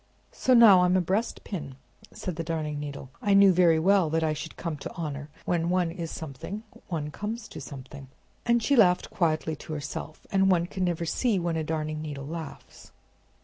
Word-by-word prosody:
"So, 255 - +2
now 215 -6 +8
I'm 180 +1 +4
a - - +4
breastpin!" 185 - -3 0.4
said 180 - -5
the 165 - -3
Darning 155 -2 -3
Needle. 145 -2 -7
"I 200 -1 +3
knew 200 -1 +7
very 170 -2 +5
well 185 0 +3
that 160 +1 +1
I 155 -1 +1
should 155 +1 -7
come 165 -2 -3
to - - -7
honor: 150 -4 -5 0.2
when 170 -1 0
one 180 -2 +1
is 170 -1 -5
something, 160 - -7 0.2
one 150 -4 -3
comes 215 +7 -5
to - - -8
something!" 135 0 -9 0.4
And 235 -1 +2
she 285 - +3
laughed 180 -7 +4
quietly 160 -2 0
to 155 - -8
herself—and 155 +6 -2
one 175 -2 +3
can 185 +1 -2
never 170 -1 -1
see 225 +5 +1
when 170 -2 -1
a 160 - -1
darning 155 -1 -3
needle 145 -3 -6
laughs. 160 0 -9
165 Hz, 190 wpm, -27 LUFS, 155-185 Hz, 0.4 s, now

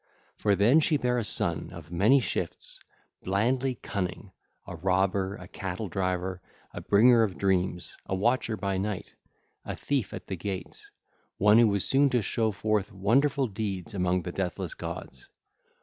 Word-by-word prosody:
For 105 -1 +2
then 115 +10 +5
she 155 -1 +2
bare 125 -2 0
a - - -1
son, 100 - 0
of 80 -1 -11
many 105 +11 +4
shifts, 125 - -4 0.4
blandly 125 +7 0
cunning, 90 -4 -4 0.3
a - - -7
robber, 95 +1 0
a 90 -3 -11
cattle 95 +1 -5
driver, 90 0 -2 0.3
a - - -6
bringer 115 +3 +5
of 100 -5 0
dreams, 90 -2 0
a 95 - -1
watcher 115 +2 +1
by 100 -2 -1
night, 100 -1 -4 0.5
a - - -5
thief 135 -8 -2
at - - -7
the 95 - -4
gates, 95 +1 -6 0.5
one 105 +3 +6
who 120 - +6
was 100 -2 +1
soon 140 +1 +4
to 125 -4 +1
show 110 +2 0
forth 105 0 -1
wonderful 130 +8 +2
deeds 105 -2 -4
among 90 -2 0
the 90 - -4
deathless 90 -2 -3
gods. 65 - -8
100 Hz, 160 wpm, -28 LUFS, 95-115 Hz, 0.5 s, one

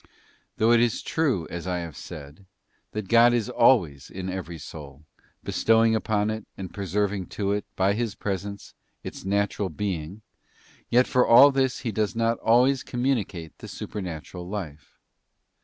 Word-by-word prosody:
Though 110 +2 +3
it 120 - +6
be 120 +1 +4
true, 125 - -1
as 85 +1 -5
I 90 -1 -1
have 85 -4 -6
said, 75 +6 -10 0.5
that 105 -2 -4
God 120 +3 +6
is 120 +1 -1
always 90 - +3
in 95 0 -5
every 90 -3 -5
soul, 75 -1 -10 0.4
bestowing 115 0 +3
upon 110 -1 0
it, 110 0 -6
and 95 -2 -7
preserving 100 -1 -1
to 100 -1 0
it, 100 0 -1
by 95 +1 +2
His 115 -1 -2
presence, 100 0 -5 0.3
its - - -8
natural 100 0 0
being, 95 0 -4 0.7
yet 125 +2 +5
for 125 - +3
all 135 +5 +8
this 130 -2 0
He 120 - -2
does 105 +2 -1
not 115 0 +1
always 125 +3 +4
communicate 115 - -2
the - - -9
supernatural 90 -1 -7
life.. 80 -8 -7
100 Hz, 155 wpm, -25 LUFS, 90-115 Hz, 0.7 s, all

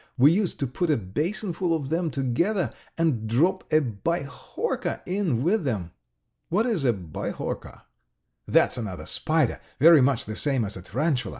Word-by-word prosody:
We 135 +4 +7
used 190 +1 0
to - - +2
put 150 +7 -2
a 150 - +3
basinful 170 - -1
of 145 -4 -4
them 165 +1 0
together 165 - 0 0.3
and 145 -10 +1
drop 170 +11 +1
a 155 - +5
bihorka 140 +4 -3
in 180 - 0
with 190 +4 +2
them." 100 - -2 0.6
"What 210 +6 +2
is 215 - 0
a 120 - +5
bihorka?" 90 -8 -5 0.6
"That's - - +3
another 95 -9 -5
spider, 155 - 0 0.2
very 160 +1 +8
much 130 -2 +2
the 110 - -5
same 135 -4 +1
as 100 - -4
a 95 - -7
tarantula. 130 - -1
145 Hz, 160 wpm, -25 LUFS, 120-170 Hz, 0.6 s, very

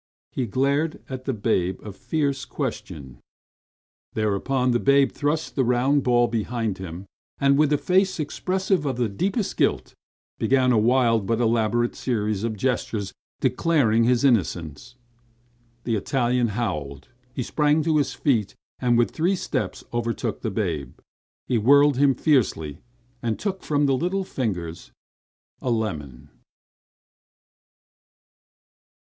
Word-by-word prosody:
He 130 -3 -2
glared 140 +8 0
at 130 -1 -6
the 135 - 0
babe 95 -4 0
a 105 - -7
fierce 140 +4 -2
question. 65 - -6 1.0
Thereupon 125 +5 0
the 120 - +2
babe 140 +1 +4
thrust 150 +2 -2
the 135 - +2
round 125 +4 +2
bulb 120 -1 +3
behind 115 -3 -2
him, 90 0 -7 0.3
and 140 0 +3
a - - +2
with 150 -1 +3
a 150 - +4
face 185 +3 +1
expressive 185 +2 -1
of 130 - -1
the 120 -2 +1
deepest 190 - -2
guilt, - - 0 0.5
began 130 -1 +3
a 120 - +3
wild 115 -2 +3
but 115 0 +1
elaborate 120 0 +1
series 105 -4 -1
of 110 -2 -2
gestures 110 -4 -2 0.3
declaring 130 -4 +2
his 125 +1 +2
innocence. 105 - 0 0.9
The 115 - 0
Italian 125 +2 +1
howled. 75 - -4 0.3
He 130 - -2
sprang 150 +4 +2
to 160 -1 +2
his 145 - 0
feet, 115 -9 0 0.2
and 120 -2 +2
with 120 - +2
three 175 +5 +1
steps - - -3
overtook 115 -1 -2
the 110 - -2
babe. 85 - -3 0.5
He 120 - +1
whirled 140 +4 +5
him 140 -1 +4
fiercely, 110 - +1 0.4
and 115 -2 -1
took 195 -2 -3
from 145 -1 +1
the 135 -1 +3
little 180 +7 -1
fingers 90 - -4 0.7
a 130 - -2
lemon. 80 - -3
120 Hz, 135 wpm, -24 LUFS, 110-140 Hz, 1.0 s, whirled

